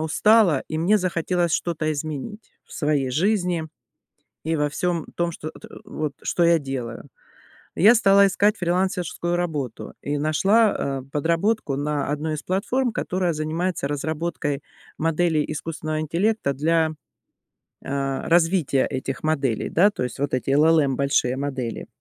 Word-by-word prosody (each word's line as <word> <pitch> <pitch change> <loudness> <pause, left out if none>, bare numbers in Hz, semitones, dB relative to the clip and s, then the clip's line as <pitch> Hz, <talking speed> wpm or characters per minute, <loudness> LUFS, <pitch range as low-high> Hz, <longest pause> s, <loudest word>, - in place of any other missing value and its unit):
устала, 175 0 +4
и 155 - -3
мне 190 +6 +3
захотелось 175 -2 0
что-то 155 -3 -1
изменить 155 - -6
в - - -18
своей 145 -4 0
жизни 180 +1 +1 0.8
и 160 +1 0
во 150 0 +1
всём 170 +1 -1
том, 170 0 0
чт 155 - -10
эт 155 - -8 0.2
вот 150 -2 -4
что 175 - +1
я 170 -1 +5
делаю. 130 -5 -6 0.7
Я 215 +6 +6
стала 200 -2 +5
искать 205 +3 +2
фрилансерскую 175 -1 -1
работу 150 -9 -3
и 145 +1 -2
нашла, 155 -2 +2
э, - - -13
подработку 165 +2 0
на 145 0 -1
одной 150 +2 -2
из 150 - -7
платформ, 235 +7 0
которая 180 -3 -1
занимается 160 +1 -2
разработкой 145 0 -3 0.4
моделей 165 -1 +1
искусственного 155 0 -4
интеллекта 170 +1 0
для, 160 +3 +1 0.9
э, 135 -1 -2
развития 165 -5 +3
этих 135 +3 -4
моделей, 140 -7 0
да. 195 +5 +4
То 165 - -3
есть 125 +1 -6
вот 140 -1 -1
эти 130 +1 -1
LLM 150 -1 +4
большие 140 -2 +1
модели. 130 -4 -4
160 Hz, 140 wpm, -23 LUFS, 145-180 Hz, 0.9 s, Я